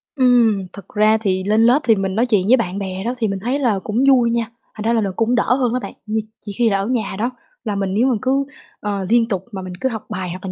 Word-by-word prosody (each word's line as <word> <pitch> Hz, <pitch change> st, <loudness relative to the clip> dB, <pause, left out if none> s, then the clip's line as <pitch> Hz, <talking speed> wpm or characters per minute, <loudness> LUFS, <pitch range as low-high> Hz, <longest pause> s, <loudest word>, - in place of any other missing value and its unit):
Ừm, 235 Hz, -7 st, +3 dB
thực 200 Hz, -2 st, -10 dB
ra 215 Hz, +1 st, +3 dB
thì 190 Hz, -3 st, 0 dB
lên 215 Hz, +3 st, +2 dB
lớp 245 Hz, +5 st, +5 dB
thì 225 Hz, -2 st, +4 dB
mình 195 Hz, 0 st, -2 dB
nói 235 Hz, -, +2 dB
chuyện 210 Hz, -6 st, +1 dB
với 255 Hz, +4 st, +6 dB
bạn 190 Hz, -4 st, -2 dB
bè 190 Hz, 0 st, -4 dB
đó 240 Hz, -, -1 dB
thì 225 Hz, -, 0 dB
mình 195 Hz, -1 st, -3 dB
thấy 250 Hz, +7 st, -1 dB
là 225 Hz, -8 st, +1 dB
cũng 225 Hz, +5 st, 0 dB
vui 245 Hz, -3 st, +4 dB
nha, 235 Hz, -1 st, 0 dB, 0.3 s
thành 215 Hz, -, -6 dB
ra 230 Hz, -, +2 dB
là 225 Hz, -, +2 dB
nó 195 Hz, -, -1 dB
cũng 230 Hz, +2 st, +1 dB
đỡ -, -, +2 dB
hơn 250 Hz, -3 st, 0 dB
đó 255 Hz, -, 0 dB
bạn. -, -, -7 dB
Nh 220 Hz, +1 st, 0 dB, 0.2 s
chỉ 205 Hz, -, -7 dB
khi 235 Hz, -2 st, +3 dB
là 200 Hz, -, +1 dB
ở 200 Hz, -, -2 dB
nhà 225 Hz, -6 st, -1 dB
đó 235 Hz, +3 st, 0 dB, 0.3 s
là 210 Hz, -3 st, -2 dB
mình 195 Hz, -1 st, -2 dB
nếu 235 Hz, +6 st, +2 dB
mà 250 Hz, -, +2 dB
cứ, 270 Hz, +1 st, +1 dB, 0.3 s
ờ, 200 Hz, -2 st, -3 dB
liên 235 Hz, -1 st, +4 dB
tục 190 Hz, -5 st, -3 dB
mà 195 Hz, -, -5 dB
mình 185 Hz, -1 st, -7 dB
cứ 260 Hz, -, +1 dB
học 220 Hz, -3 st, -6 dB
bài 185 Hz, -4 st, -4 dB
hoặc 185 Hz, +2 st, -7 dB
là 185 Hz, -, -4 dB
220 Hz, 295 wpm, -19 LUFS, 195-240 Hz, 0.3 s, với